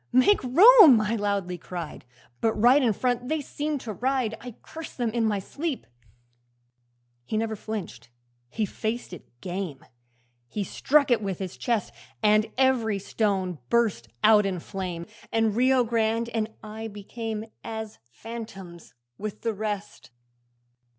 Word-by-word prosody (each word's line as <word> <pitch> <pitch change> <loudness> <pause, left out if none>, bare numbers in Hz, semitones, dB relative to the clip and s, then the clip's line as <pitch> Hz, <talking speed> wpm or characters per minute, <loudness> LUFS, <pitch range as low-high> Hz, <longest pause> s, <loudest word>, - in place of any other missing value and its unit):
make 255 +10 +4
room!" 335 - +8
I 215 +1 0
loudly 200 -4 -1
cried, 170 -3 -7 0.3
But 225 -1 +2
right 245 +6 +5
in 240 -4 +3
front 245 +3 -1
they 315 0 +1
seemed 290 0 -3
to 220 - -5
ride 250 -1 0
I 245 -1 -8
cursed 325 -1 -9
them 240 -3 0
in 230 0 0
my 210 -2 +1
sleep. 285 - -4 1.4
'He 215 - -3
never 220 0 -1
flinched, 200 - -6 0.4
he 220 - -1
faced 220 +1 -4
it 180 - -11
game, 180 -6 -5 0.6
He 205 - -3
struck 280 +8 +2
it 235 - +4
with 195 -4 -3
his 185 -2 -5
chest, 235 -4 -1 0.3
And 215 +1 +4
every 250 -6 +2
stone 195 -4 -1
burst 220 - +1 0.2
out 215 -1 +7
in 190 -3 -2
flame, 180 -2 -5 0.3
And 225 -2 +2
Rio 255 +1 +4
Grande 230 0 0
and 225 -2 -1
I 220 +1 -6
became 220 +1 -5 0.2
As 220 -1 -6
phantoms 195 - -9 0.2
with 210 -1 -5
the 225 -1 -1
rest. 210 -1 -5
220 Hz, 145 wpm, -26 LUFS, 200-240 Hz, 1.4 s, room